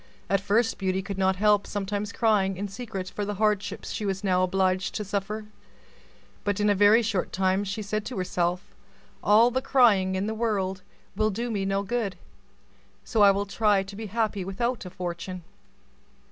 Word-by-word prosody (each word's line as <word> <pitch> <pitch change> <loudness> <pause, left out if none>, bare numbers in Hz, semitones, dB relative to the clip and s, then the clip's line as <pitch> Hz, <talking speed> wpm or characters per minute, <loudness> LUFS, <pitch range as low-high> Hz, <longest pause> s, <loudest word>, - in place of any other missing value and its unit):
At 195 -1 +3
first 220 +4 +1
Beauty 190 -1 -1
could 195 -1 -5
not 190 0 +3
help 205 +1 +3
sometimes 205 0 -3
crying 200 -5 +1
in 200 +2 -3
secret 195 -2 -6
for 205 - -3
the 205 0 -3
hardships 210 -1 -1
she 220 - -4
was 195 -1 -2
now 185 -2 +2
obliged 185 0 +1
to 210 - -3
suffer; 205 +2 -3 1.0
but 205 -1 -1
in 210 0 +3
a - - +5
very 205 +4 +5
short 205 -5 -1
time 190 +1 +1
she 205 +2 -4
said 215 +1 -2
to 250 - -5
herself, 180 0 -2 0.5
"All 225 +4 +5
the 260 +2 0
crying 210 -9 +4
in 190 +1 -1
the 220 - -2
world 200 -4 -1 0.3
will 215 +1 +2
do 235 +4 -3
me 200 -3 -1
no 195 +1 0
good, 205 -2 -2 0.9
so 225 - 0
I 200 - +8
will 200 +1 +1
try 205 -1 +2
to 195 +1 -10
be 220 +1 -6
happy 215 -2 -1
without 235 +5 -2
a - - -6
fortune." 180 0 -6
200 Hz, 185 wpm, -26 LUFS, 190-215 Hz, 1.0 s, I